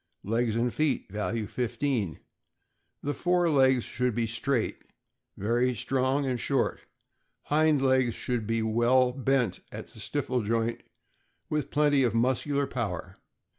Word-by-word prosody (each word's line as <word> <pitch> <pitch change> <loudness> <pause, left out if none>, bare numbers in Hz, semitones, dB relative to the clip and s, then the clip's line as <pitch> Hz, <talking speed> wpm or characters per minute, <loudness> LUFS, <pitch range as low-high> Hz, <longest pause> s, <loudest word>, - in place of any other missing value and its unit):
Legs 115 +1 0
and 120 +1 0
feet 150 -9 0
(value 105 +2 -2
15). 120 - -2 0.4
— - - -49
The 145 - -1
fore 175 +1 +2
legs 130 -3 +4
should 125 -3 -1
be 115 - +1
straight, 115 +2 -1 0.6
very 120 +4 +1
strong, 130 +5 0
and 125 -2 -1
short; 135 +1 0 0.6
hind 150 -2 +2
legs 130 -3 +3
should 120 -4 -3
be 115 0 0
well 120 +3 +3
bent 135 -5 0
at - - -7
the - - -14
stifle 125 -1 -1
joint, 115 +2 -1 0.7
with 150 -2 -1
plenty 145 -1 +3
of 120 -4 +1
muscular 130 +4 +1
power. 95 -8 -4
125 Hz, 135 wpm, -28 LUFS, 115-135 Hz, 0.7 s, legs